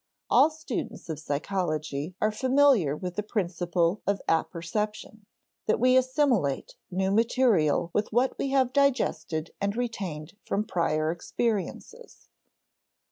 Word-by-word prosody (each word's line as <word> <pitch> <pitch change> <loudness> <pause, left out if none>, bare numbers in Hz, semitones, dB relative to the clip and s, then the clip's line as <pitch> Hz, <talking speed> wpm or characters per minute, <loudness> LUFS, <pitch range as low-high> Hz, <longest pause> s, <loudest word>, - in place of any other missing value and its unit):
All - - +6
students 310 - -6
of 155 -2 -4
psychology 155 0 -2
are 215 - +2
familiar 255 - +3
with 180 +1 -6
the - - +1
principle 180 -3 -1
of 200 -1 +1
apperception 205 +6 -2 0.4
that 215 - +2
we 255 +2 +4
assimilate 255 - +1 0.2
new 190 +1 0
material 210 - +2
with 210 - 0
what 245 +4 +2
we 275 - -1
have 260 -2 +2
digested 250 - +1
and 200 +1 0
retained 190 -10 -4
from 205 - -1
prior 155 -4 0
experiences. 230 - -4
200 Hz, 120 wpm, -27 LUFS, 170-245 Hz, 0.4 s, All